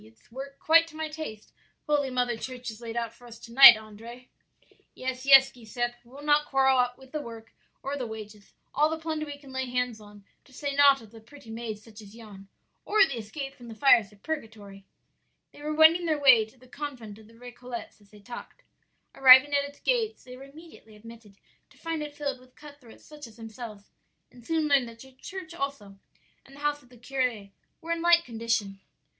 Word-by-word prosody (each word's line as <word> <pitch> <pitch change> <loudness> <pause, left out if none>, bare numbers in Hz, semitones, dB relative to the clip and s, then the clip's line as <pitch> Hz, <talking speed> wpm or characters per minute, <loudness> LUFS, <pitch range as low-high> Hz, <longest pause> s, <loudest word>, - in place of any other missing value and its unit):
It's 110 - -22
work 275 +3 -8
quite 330 +1 +4
to 320 - -15
my 315 0 -4
taste 305 -9 -8 0.3
Holy 290 -2 +1
Mother 245 -2 -1
Church 250 +1 -7
has 220 +1 -10
laid 230 0 -6
out 235 -1 -3
for 245 - -17
us 230 -1 -12
to 230 - -13
night, 270 -3 +11
Andrea.' 225 +3 -12 0.7
"'Yes, 255 +1 -5
yes, 270 -1 +8
Giuseppe, 240 +1 -4
we'll 265 +4 -14
not 295 0 +2
quarrel 265 -2 +3
with 265 -1 -17
the 305 - -4
work 230 -3 -11 0.3
or 275 +1 -3
the 255 -4 -4
wages; 210 -2 -11 0.2
all 300 +2 +3
the 320 - -3
plunder 315 -1 -4
we 290 -1 -7
can 280 -2 -15
lay 260 0 -3
hands 250 -3 -2
on; 205 -1 -15 0.2
to - - -22
say 280 +2 -4
naught 280 -3 +5
of 215 - -16
the 225 -1 -14
pretty 230 0 -14
maids 225 -2 -6
such 220 -1 -14
as 205 +1 -14
yon, 205 -4 -13 0.4
or 420 -1 +4
the 250 -9 -5
escape 270 +6 -7
from 240 -3 -14
the 225 - -9
fires 230 -4 +4
of 205 -1 -23
purgatory.' 215 -10 -7 0.7
"They - - -16
were 300 +1 -4
wending 325 +2 +5
their 310 -2 +1
way 255 -6 +6
to 220 +4 -22
the 255 +1 -20
convent 250 -7 -8
of 215 - -17
the 230 - -19
Récollets 245 -1 -10
as 205 - -23
they 210 0 -17
talked. 240 +4 -11 0.5
Arrived 260 0 +8
at 285 0 +1
its 285 - -19
gates 455 -3 -1
they 250 0 -11
were 265 +2 -12
immediately 285 -6 -16
admitted, 225 -2 -15 0.3
to - - -23
find 330 -1 -4
it 295 -1 -7
filled 280 -3 -4
with 255 0 -22
cut 290 -1 -14
throats 230 -3 -17
such 295 -3 -11
as 225 0 -17
themselves, 225 -2 -10 0.4
and 245 -1 -17
soon 320 -2 0
learned 275 -5 +2
that 230 - -14
the 265 +2 -14
church 360 +6 -9
also 275 - -6 0.4
and 275 - -17
the - - -14
house 295 0 -1
of 245 - -23
the 250 - -17
curé 245 -5 -3 0.3
were 330 - -6
in 335 0 -1
like 340 0 +4
condition. 225 -4 -2
255 Hz, 215 wpm, -27 LUFS, 225-290 Hz, 0.7 s, night